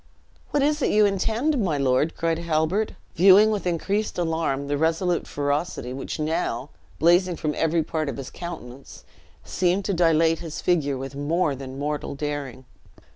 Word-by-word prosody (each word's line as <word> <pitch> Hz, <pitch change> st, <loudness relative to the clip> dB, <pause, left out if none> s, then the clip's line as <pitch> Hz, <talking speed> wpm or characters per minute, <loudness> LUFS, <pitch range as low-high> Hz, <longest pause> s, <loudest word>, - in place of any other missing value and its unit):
"What 290 Hz, -, +1 dB
is 300 Hz, +1 st, +1 dB
it -, -, +2 dB
you 210 Hz, 0 st, +4 dB
intend, 225 Hz, +7 st, 0 dB
my 160 Hz, -6 st, 0 dB
lord?" 135 Hz, +3 st, +1 dB
cried 165 Hz, 0 st, 0 dB
Halbert, 170 Hz, +5 st, 0 dB, 0.2 s
viewing 195 Hz, +5 st, +6 dB
with 205 Hz, -3 st, -2 dB
increased 200 Hz, +5 st, -1 dB
alarm 160 Hz, -5 st, -1 dB
the 145 Hz, -, 0 dB
resolute 165 Hz, +3 st, 0 dB
ferocity 145 Hz, -3 st, -2 dB
which 135 Hz, -, -5 dB
now, 155 Hz, -4 st, -2 dB, 0.3 s
blazing 175 Hz, +2 st, +3 dB
from 155 Hz, -2 st, -2 dB
every 165 Hz, 0 st, +1 dB
part 155 Hz, -1 st, -2 dB
of 130 Hz, -, -5 dB
his 135 Hz, -1 st, -7 dB
countenance, 140 Hz, -7 st, -9 dB, 0.4 s
seemed 185 Hz, +2 st, 0 dB
to 200 Hz, -, 0 dB
dilate 165 Hz, -2 st, +3 dB
his 165 Hz, -2 st, -6 dB
figure 145 Hz, -6 st, +1 dB
with 135 Hz, +1 st, -6 dB
more 150 Hz, +2 st, 0 dB
than 135 Hz, 0 st, -8 dB
mortal 145 Hz, 0 st, -3 dB
daring. 140 Hz, -3 st, -5 dB
165 Hz, 160 wpm, -24 LUFS, 145-180 Hz, 0.4 s, viewing